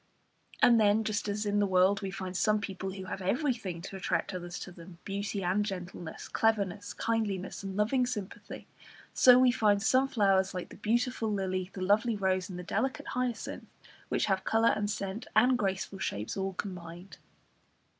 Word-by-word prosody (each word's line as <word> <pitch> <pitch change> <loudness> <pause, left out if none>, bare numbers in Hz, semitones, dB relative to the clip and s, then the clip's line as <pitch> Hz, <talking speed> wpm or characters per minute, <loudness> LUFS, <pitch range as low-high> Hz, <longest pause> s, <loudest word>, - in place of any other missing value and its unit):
And 235 -2 +7
then, 210 +1 +4
just 215 -1 -2
as 210 +1 -2
in 205 0 +1
the 205 - +3
world 190 +1 +3
we 195 - -3
find 185 -1 -6
some 215 +3 +2
people 190 -1 -5
who 190 -1 -7
have 190 - -5
everything 205 - -1
to 195 - -7
attract 190 +1 -1
others 175 -1 -5
to 190 - -7
them, 170 0 -12
beauty 200 0 -3
and 185 +4 +1
gentleness, 180 -4 -6
cleverness, 205 -3 0
kindliness, 205 -5 -2
and 195 -1 -5
loving 245 +4 +2
sympathy, 210 -6 -6 0.5
so 250 -1 +7
we 255 -1 +6
find 210 -4 +2
some 260 +4 +4
flowers, 195 -6 +2
like 180 - -4
the - - -11
beautiful 230 +1 0
lily, 185 -2 -2
the 190 - -7
lovely 215 +4 +3
rose, 190 -2 0
and 180 - -6
the 180 - -6
delicate 260 +8 -2
hyacinth, 250 -2 -3 0.4
which - - +1
have 195 -2 0
colour 225 +1 +3
and 205 -1 -1
scent 200 +2 -4
and 245 +4 +5
graceful 195 -3 -2
shapes 105 - -3
all 195 0 -2
combined. 180 -1 -7
200 Hz, 175 wpm, -30 LUFS, 190-220 Hz, 0.5 s, And